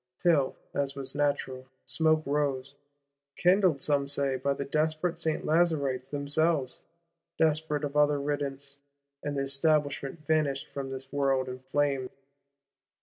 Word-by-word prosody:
Till, 155 -7 +2 0.2
as 140 -1 -1
was 135 -1 -3
natural, 140 -3 -1 0.2
smoke 155 -1 +2
rose,—kindled, 140 +4 -1
some 140 -2 +2
say, 140 -1 +1
by 140 +2 -1
the 140 - -4
desperate 155 +3 0
Saint 160 -2 -1
Lazaristes 145 -6 +1
themselves, 145 -1 0 0.6
desperate 155 -1 +1
of 145 0 -3
other 150 -1 +4
riddance; 140 -1 -3 0.4
and 145 -1 -3
the 135 - 0
Establishment 145 +1 0
vanished 150 -4 +1
from 135 -1 -4
this 135 +1 -7
world 135 -2 +1
in 130 0 -6
flame. 135 0 -1
140 Hz, 125 wpm, -29 LUFS, 135-155 Hz, 0.6 s, other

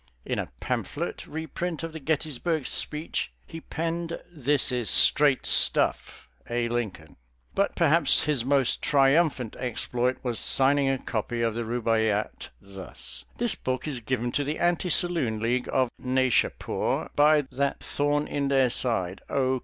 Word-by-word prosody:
In - - -2
a - - -3
pamphlet - - -4
reprint 160 +2 -4
of 165 -1 -5
the 160 - -6
Gettysburg 155 0 -1
Speech 150 +2 0
he 165 - -9
penned 165 +1 -3
"This 145 -3 +1
is 125 -3 -1
straight 145 -3 +4
stuff, - - +1 0.2
A. 120 0 0
Lincoln." 105 -11 -4 0.4
But - - 0
perhaps - - +4
his 145 -6 0
most 135 -1 +2
triumphant 140 -4 +2
exploit 125 0 -1
was 120 -3 -2
signing 140 +1 +3
a 135 - +1
copy 115 -1 -3
of 115 -1 +1
the 120 - -3
Rubaiyat 110 -2 -1
thus: 95 -1 -7
"This 240 -1 +1
book 130 +2 -3
is 140 -5 -3
given 120 0 -2
to 145 - 0
the 150 +2 -3
Anti 175 +1 +1
Saloon 165 -12 +1
League 120 +3 -1
of 130 -2 +2
Naishapur 130 -1 0
by 150 0 +5
that 140 +2 -1
thorn 145 +1 0
in 140 -1 -1
their 135 -3 +3
side, 95 -8 -1
O. 130 -1 +1
130 Hz, 145 wpm, -26 LUFS, 120-150 Hz, 0.4 s, by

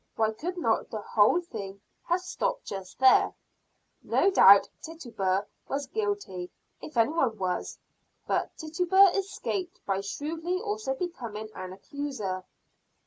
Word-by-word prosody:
Why 220 -1 +2
could 355 +10 -5
not 230 -10 +1
the 215 - -4
whole 215 +12 +3
thing 200 - -7 0.3
have 350 +2 +1
stopped - - -2
just 190 -2 -7
there? 260 0 +5 0.7
No 395 - +2
doubt 200 - +8
Tituba 225 - -2 0.2
was 280 +1 -2
guilty, 405 - -3 0.3
if 300 - -8
any 230 +4 +4
one 260 -9 +1
was. 180 -2 -2 0.5
But - - -1
Tituba 360 +5 +4
escaped, 385 -2 -3
by 195 -1 0
shrewdly 320 - -3
also 415 -9 -2
becoming 235 - -5
an 185 0 -7
accuser. 205 -6 -5
275 Hz, 130 wpm, -28 LUFS, -, 0.7 s, doubt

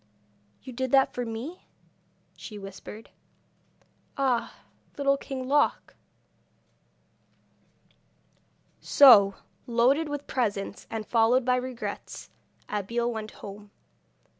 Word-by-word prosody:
'You 255 - -9
did 260 +2 -2
that 270 -1 +4
for 245 -1 -3
me?' 245 +11 -7 0.7
she 215 - -9
whispered. 200 +2 -10 1.1
'Ah, 260 -4 -1 0.4
Little 275 -1 +2
King 265 -2 -6
Loc 290 +2 +1 1.0
!' - - -41 1.3
So, 205 -8 +7 0.3
loaded 255 +7 +2
with 290 -1 -5
presents, 205 -6 -3
and 225 -1 -4
followed 235 +3 +3
by 250 0 +3
regrets, 250 -1 -6 0.4
Abeille 230 +4 -2
went 220 -2 -5 0.2
home. 205 +1 -10
240 Hz, 95 wpm, -27 LUFS, 215-265 Hz, 1.3 s, So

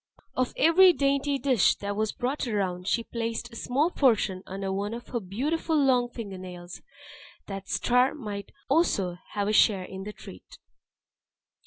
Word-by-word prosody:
Of 255 -1 0
every 360 +3 +6
dainty 280 -1 +1
dish 260 -6 +3
that 200 0 -4
was 215 0 0
brought 255 +2 -2
round, 185 -4 -2
she 230 +2 +1
placed 230 +1 -4
a - - -12
small 280 +9 0
portion 215 - +2
under 195 0 -4
one 205 +3 -2
of 240 - -10
her 240 - -2
beautiful 285 - -2
long 255 -4 +3
finger 205 -6 -7
nails, 180 -1 -9 0.6
that 195 -1 -7
Star 250 +4 +2
might 210 -8 -6 0.2
also 205 - +1 0.2
have 205 -1 -1
a 210 - +1
share 200 -3 +4
in 190 +1 -8
the 205 +2 -6
treat. - - -13
230 Hz, 160 wpm, -27 LUFS, 195-265 Hz, 0.6 s, every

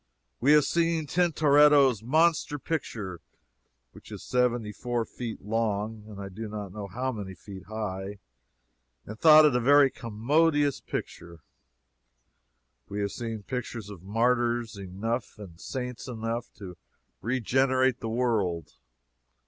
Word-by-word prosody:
We 140 +5 +5
have 150 -1 +6
seen 165 -2 +1
Tintoretto's 145 - +4
monster 155 +4 +2
picture, 110 - -4 0.7
which - - -15
is - - -8
seventy 120 -3 0
four 120 +1 -2
feet 115 -2 -7
long 110 0 -2
and 105 -2 -10
I 100 - -5
do 110 +4 -7
not 105 -3 -6
know 105 -1 -6
how 125 +6 -3
many 100 -5 -7
feet 95 +2 -11
high, 100 -2 -5 0.9
and 110 +2 -9
thought 155 -1 +8
it 145 -5 +3
a - - +3
very 140 +2 +5
commodious 145 +6 +1
picture. 85 -2 -7 1.5
We 100 - -4
have 100 -1 -1
seen 115 -2 -5
pictures 120 -3 -5
of 95 -5 -10
martyrs 120 +2 0
enough, 100 +6 -4
and 95 -5 -12
saints 125 -2 -5
enough, 115 0 -4
to 95 -4 -10 0.4
regenerate 130 +2 +1
the 115 - -4
world. 105 -9 -1
115 Hz, 130 wpm, -27 LUFS, 105-130 Hz, 1.5 s, thought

